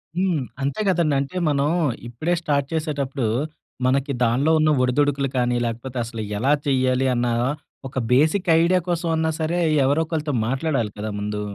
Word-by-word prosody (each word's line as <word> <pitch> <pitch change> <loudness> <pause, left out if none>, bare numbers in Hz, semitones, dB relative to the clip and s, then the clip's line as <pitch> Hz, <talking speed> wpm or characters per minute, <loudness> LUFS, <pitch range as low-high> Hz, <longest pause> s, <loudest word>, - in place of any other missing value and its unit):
హ్మ్. 180 -7 +1 0.2
అంతే 140 +10 -1
కదండీ. 165 -5 +2
అంటే 160 +7 -5
మనం 140 0 +1 0.4
ఇప్పుడే 155 +9 -2
స్టార్ట్ 140 -4 0
చేసేటప్పుడు 140 -5 -2 0.6
మనకి 135 +2 +1
దానిలో 130 +7 +2
ఉన్న 155 - +3
ఒడిదుడుకులు 140 +1 +1
కానీ, 125 0 +1
లేకపోతే 120 +3 -5
అసలు 115 -1 -6 0.2
ఎలా 135 +7 +2
చేయాలి 130 -1 +2
అన్న 120 0 0 0.6
ఒక 135 - -9
బేసిక్ 155 +9 +3
ఐడియా 180 +2 +3
కోసం 170 -1 -1
అన్నా 160 0 +1
సరే! 165 +2 0 0.3
ఎవరో 145 +4 +2
ఒకరితో 155 -2 -2 0.2
మాట్లాడాలి 135 -4 -1
కదా 110 +1 -3
ముందు. 105 0 -3
140 Hz, 150 wpm, -22 LUFS, 125-160 Hz, 0.6 s, ఉన్న